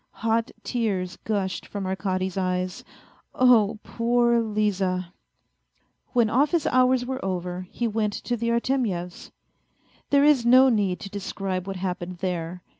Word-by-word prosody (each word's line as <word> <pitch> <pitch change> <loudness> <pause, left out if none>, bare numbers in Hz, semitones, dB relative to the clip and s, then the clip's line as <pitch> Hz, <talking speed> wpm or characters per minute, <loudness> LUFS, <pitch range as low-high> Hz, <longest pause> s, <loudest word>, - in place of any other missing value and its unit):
Hot 230 +1 +1
tears 195 -7 -2
gushed 200 -4 -2
from 200 -2 -5
Arkady's 190 -1 -2
eyes: 185 -1 -2 0.5
oh, 235 -5 +4
poor 235 0 +2
Liza! 195 -5 -1 1.0
When 240 -3 +4
office 290 +8 +2
hours 255 0 +3
were 260 +1 -4
over, 180 -1 -3
he 240 - -2
went 215 -1 -1
to 240 - -3
the 235 0 -2
Artemyevs'. 235 -8 -1 0.8
There 280 0 +4
is 295 -5 +5
no 255 +3 +6
need 200 -6 +1
to 200 - -7
describe 195 -2 -4
what 195 - -4
happened 180 -1 -4
there 175 -1 -4
205 Hz, 130 wpm, -25 LUFS, 185-240 Hz, 1.0 s, no